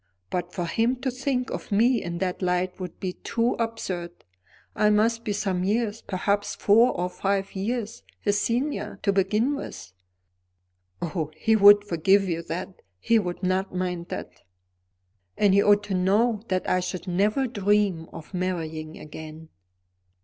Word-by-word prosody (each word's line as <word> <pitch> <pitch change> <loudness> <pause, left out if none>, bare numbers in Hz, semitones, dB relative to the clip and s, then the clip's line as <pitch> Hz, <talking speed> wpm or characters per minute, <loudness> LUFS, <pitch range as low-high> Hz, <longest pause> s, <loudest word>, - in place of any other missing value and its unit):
"But 175 0 -2
for 175 -1 -3
him 230 +8 +1
to 265 -1 -1
think 255 0 -2
of - - -6
me 230 +4 +3
in 170 0 -4
that 180 +1 -2
light 180 0 0
would 180 -1 -7
be 185 -1 -3
too 235 +5 -1
absurd. 195 -7 -3 0.7
I 210 - +3
must 225 +2 +2
be 210 - -2
some 195 -3 -1
years, 215 +2 0
perhaps 200 +2 -1
four 230 +5 +5
or 180 0 -1
five 195 +1 -2
years, 220 +3 -3 0.2
his 205 0 +1
senior, 255 +6 -1
to 200 - +2
begin 210 +8 +2
with." 95 - -8 1.1
"Oh, 165 -3 -2
he 220 +5 +3
would 205 0 +8
forgive 195 +1 +2
you 170 -2 -1
that; 175 +3 -6 0.2
he 225 - +3
would 180 -2 -4
not 185 +1 0
mind 180 -1 -2
that." - - -7 1.0
"And 200 -2 +4
he 200 - +5
ought 205 0 +4
to 205 -1 -4
know 205 +4 +2
that 185 -1 -1
I 185 - +2
should 185 +1 -5
never 205 +9 +1
dream 205 -6 +1
of 165 +3 -11
marrying 160 -4 -3
again." 155 +1 -10
195 Hz, 155 wpm, -25 LUFS, 180-215 Hz, 1.1 s, would